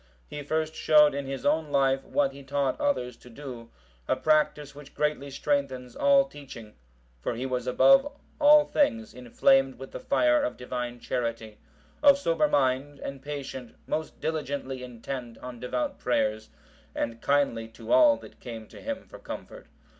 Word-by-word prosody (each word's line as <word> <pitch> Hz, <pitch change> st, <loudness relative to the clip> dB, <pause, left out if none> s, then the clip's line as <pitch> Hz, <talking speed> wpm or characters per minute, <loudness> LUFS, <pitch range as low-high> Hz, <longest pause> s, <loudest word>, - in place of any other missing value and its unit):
He 145 Hz, -, -6 dB
first 155 Hz, +2 st, -1 dB
showed 150 Hz, -2 st, +5 dB
in 140 Hz, -1 st, -4 dB
his 135 Hz, -1 st, -5 dB
own 155 Hz, -1 st, +2 dB
life 135 Hz, -1 st, +2 dB
what 140 Hz, -2 st, +1 dB
he 140 Hz, +1 st, -12 dB
taught 140 Hz, -1 st, -1 dB
others 125 Hz, -, 0 dB
to 125 Hz, -, -16 dB
do, 120 Hz, -2 st, -9 dB, 0.4 s
a -, -, +2 dB
practice 150 Hz, 0 st, +1 dB
which 145 Hz, 0 st, -13 dB
greatly 150 Hz, -2 st, -1 dB
strengthens 135 Hz, -3 st, -2 dB
all 280 Hz, -1 st, +5 dB
teaching; 130 Hz, -, -11 dB, 0.5 s
for 115 Hz, -, -2 dB
he 125 Hz, +3 st, -4 dB
was 125 Hz, -1 st, -2 dB
above 275 Hz, -, +5 dB, 0.3 s
all 295 Hz, 0 st, +7 dB
things 230 Hz, -7 st, 0 dB
inflamed 135 Hz, +2 st, +2 dB
with 135 Hz, +1 st, -9 dB
the -, -, -6 dB
fire 125 Hz, -2 st, +3 dB
of -, -, -2 dB
Divine 125 Hz, -1 st, -5 dB
charity, 115 Hz, -3 st, -4 dB, 0.4 s
of 285 Hz, -1 st, +7 dB
sober 200 Hz, -7 st, +1 dB
mind 140 Hz, -1 st, +1 dB
and 135 Hz, -1 st, -7 dB
patient, 135 Hz, -3 st, -7 dB
most 155 Hz, 0 st, -4 dB
diligently 145 Hz, -4 st, -3 dB
intent 120 Hz, -1 st, -7 dB
on 125 Hz, -1 st, -9 dB
devout 280 Hz, -, -3 dB
prayers, 110 Hz, -3 st, 0 dB, 0.5 s
and 115 Hz, 0 st, -3 dB
kindly 140 Hz, -6 st, +1 dB
to 115 Hz, -, -9 dB
all 305 Hz, -2 st, +6 dB
that -, -, -14 dB
came 115 Hz, -3 st, -8 dB
to -, -, -13 dB
him 280 Hz, 0 st, -5 dB
for -, -, -12 dB
comfort. -, -, -9 dB
135 Hz, 160 wpm, -27 LUFS, 125-155 Hz, 0.5 s, all